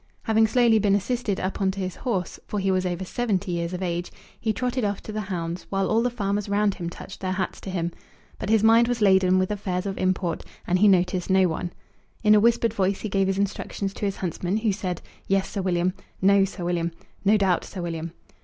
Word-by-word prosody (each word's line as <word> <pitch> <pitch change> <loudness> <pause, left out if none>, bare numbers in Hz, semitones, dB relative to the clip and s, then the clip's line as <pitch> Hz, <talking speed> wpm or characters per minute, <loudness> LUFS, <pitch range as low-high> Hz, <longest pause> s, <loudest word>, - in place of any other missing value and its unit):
Having 220 0 +4
slowly 230 -1 +4
been 200 -1 +3
assisted 220 0 -1
up 190 +2 -3
on 190 - +3
to 195 +1 -4
his 185 -1 -3
horse, 195 -9 -2
for 210 - -3
he 195 0 +1
was 185 0 +1
over 180 +1 -3
seventy 200 -3 -1
years 170 0 -2
of 185 +1 -4
age, 175 0 -2 0.3
he 220 - 0
trotted 250 +2 -1
off 205 -1 0
to - - -7
the 215 0 -2
hounds, 175 -3 -4
while 195 -1 0
all 225 +1 +3
the 245 - +1
farmers 205 -3 -2
round 205 0 +2
him 170 -2 -5
touched 190 +2 -10
their 185 -1 -2
hats 190 0 -3
to - - -7
him. 175 -2 -2 0.5
But 210 - -4
his 220 -1 +4
mind 230 +1 +6
was 245 -1 -1
laden 190 -2 +5
with 185 +2 +1
affairs 190 -2 -2
of 195 -1 -3
import, 185 -3 0 0.2
and 180 +1 +1
he 210 - +6
noticed 180 -1 +2
no 190 -1 +5
one. 175 +1 -3 0.5
In 210 -1 +6
a 210 - +7
whispered 230 0 +3
voice 195 -2 0
he 215 - -3
gave 195 0 +2
his 195 0 0
instructions 200 0 -2
to 205 - -4
his 195 -1 -1
huntsman, 180 +2 -2
who 220 -1 +1
said, 185 -3 -4 0.2
"Yes, 195 0 +2
Sir 200 - -2
William," 180 -1 +1 0.3
"No, 195 0 +5
Sir 185 -2 -6
William," 170 -1 0 0.3
"No 210 +2 +5
doubt, 190 -4 +2
Sir 185 - -6
William." 165 -1 -4
195 Hz, 230 wpm, -25 LUFS, 180-210 Hz, 0.5 s, a